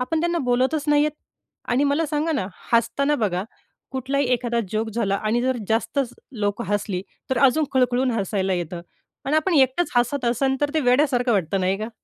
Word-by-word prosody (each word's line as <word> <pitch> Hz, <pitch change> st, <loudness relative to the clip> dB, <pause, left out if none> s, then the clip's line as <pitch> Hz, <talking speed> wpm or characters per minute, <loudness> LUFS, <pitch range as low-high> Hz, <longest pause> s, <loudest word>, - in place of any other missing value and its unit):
आपण 315 Hz, +6 st, -1 dB
त्यांना 345 Hz, +1 st, 0 dB
बोलतच 260 Hz, +5 st, +1 dB
नाहीयेत. 295 Hz, +1 st, +3 dB, 0.6 s
आणि 250 Hz, +4 st, +2 dB
मला 290 Hz, +3 st, +1 dB
सांगा 305 Hz, +2 st, -1 dB
ना? 270 Hz, -11 st, -1 dB, 0.3 s
हसताना 235 Hz, +6 st, +2 dB
बघा, 195 Hz, -6 st, -1 dB, 0.5 s
कुठलाही 270 Hz, +2 st, -1 dB
एखादा 240 Hz, -1 st, 0 dB
जोक 220 Hz, +1 st, -1 dB
झाला 205 Hz, -3 st, 0 dB
आणि 215 Hz, +3 st, 0 dB
जर 260 Hz, 0 st, +1 dB
जास्तच 240 Hz, +3 st, 0 dB, 0.2 s
लोकं 205 Hz, +2 st, -1 dB
हसली, 205 Hz, -2 st, -1 dB, 0.3 s
तर 260 Hz, -, +1 dB
अजून 285 Hz, +4 st, +4 dB
खळखळून 255 Hz, 0 st, +2 dB
हसायला 195 Hz, -3 st, -1 dB
येतं. 175 Hz, 0 st, -4 dB, 0.4 s
आणि 285 Hz, +3 st, +1 dB
आपण 325 Hz, +3 st, +1 dB
एकटंच 270 Hz, +5 st, +3 dB
हसत 245 Hz, +3 st, +1 dB
असन, 265 Hz, +3 st, +1 dB
तर 290 Hz, 0 st, +1 dB
ते 315 Hz, -, +3 dB
वेड्यासारखं 250 Hz, -2 st, +2 dB
वाटतं 190 Hz, -1 st, 0 dB
नाही 190 Hz, +1 st, 0 dB
का? 215 Hz, +1 st, -4 dB
250 Hz, 175 wpm, -23 LUFS, 215-285 Hz, 0.6 s, अजून